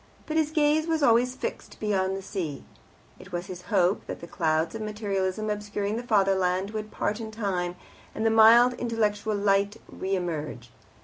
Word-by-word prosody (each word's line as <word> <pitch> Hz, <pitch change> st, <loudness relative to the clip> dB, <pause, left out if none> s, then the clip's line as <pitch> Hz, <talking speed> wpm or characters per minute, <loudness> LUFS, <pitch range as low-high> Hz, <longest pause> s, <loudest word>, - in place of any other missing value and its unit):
But 310 Hz, -, -4 dB
his 315 Hz, -2 st, +2 dB
gaze 310 Hz, +1 st, +2 dB
was 320 Hz, -2 st, 0 dB
always 245 Hz, 0 st, +4 dB
fixed -, -, -6 dB
beyond 195 Hz, -3 st, 0 dB
the 195 Hz, -, -7 dB
sea. 165 Hz, -9 st, -4 dB, 0.6 s
It -, -, -13 dB
was 175 Hz, 0 st, -3 dB
his 185 Hz, -2 st, -8 dB
hope 190 Hz, -2 st, +2 dB
that -, -, -5 dB
the -, -, -8 dB
clouds 160 Hz, -1 st, 0 dB
of 225 Hz, -, -5 dB
materialism 210 Hz, -1 st, -2 dB
obscuring 210 Hz, 0 st, -3 dB
the 235 Hz, -, -2 dB
Fatherland 195 Hz, -4 st, +1 dB
would 215 Hz, -1 st, -5 dB
part 210 Hz, +1 st, -2 dB
in 220 Hz, -, -5 dB
time, 190 Hz, -5 st, -2 dB, 0.4 s
and 220 Hz, -, -2 dB
the 225 Hz, -, +4 dB
mild 230 Hz, +3 st, +7 dB
intellectual 220 Hz, -3 st, -1 dB
light 200 Hz, 0 st, +2 dB
re 190 Hz, +1 st, -3 dB
emerge. 155 Hz, -9 st, -4 dB
205 Hz, 175 wpm, -27 LUFS, 185-225 Hz, 0.6 s, mild